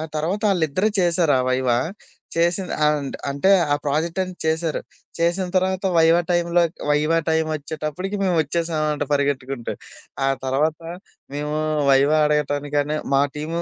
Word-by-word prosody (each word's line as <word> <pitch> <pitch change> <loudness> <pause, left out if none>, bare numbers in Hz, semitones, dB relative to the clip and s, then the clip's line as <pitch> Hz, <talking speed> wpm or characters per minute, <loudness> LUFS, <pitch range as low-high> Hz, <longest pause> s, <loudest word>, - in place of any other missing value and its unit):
తర్వాత 170 +7 -1
ఆళ్ళిద్దరె 180 +3 +1
చేశారు 170 -3 +2
ఆ - - +2
వైవా. 130 -2 +1 0.6
చేసింది 175 +2 +1
అండ్ 145 -2 -1 0.2
అంటే, 140 +8 +2 0.2
ఆ - - +4
ప్రాజెక్టని 170 +6 -1
చేశారు. 160 0 0 0.4
చేసిన 170 +3 +1
తర్వాత 190 +1 0
వైవా 165 +1 +5
టైమ్‌లో 175 0 +2 0.3
వైవా 150 +3 +2
టైమొచ్చేటప్పటికి 155 +4 -2
మేమొచ్చేసాం 165 -2 0
అంట 145 - -2
పరిగెత్తుకుంటూ. 135 -3 -1 0.5
ఆ - - +3 0.2
తర్వాత 150 +5 0 0.5
మేము 150 +1 -3 0.4
వైవా 140 +3 +4
అడగటానికని 145 0 0 0.2
మా 135 - +4 0.2
టీము 165 +3 -3
155 Hz, 120 wpm, -22 LUFS, 145-170 Hz, 0.6 s, వైవా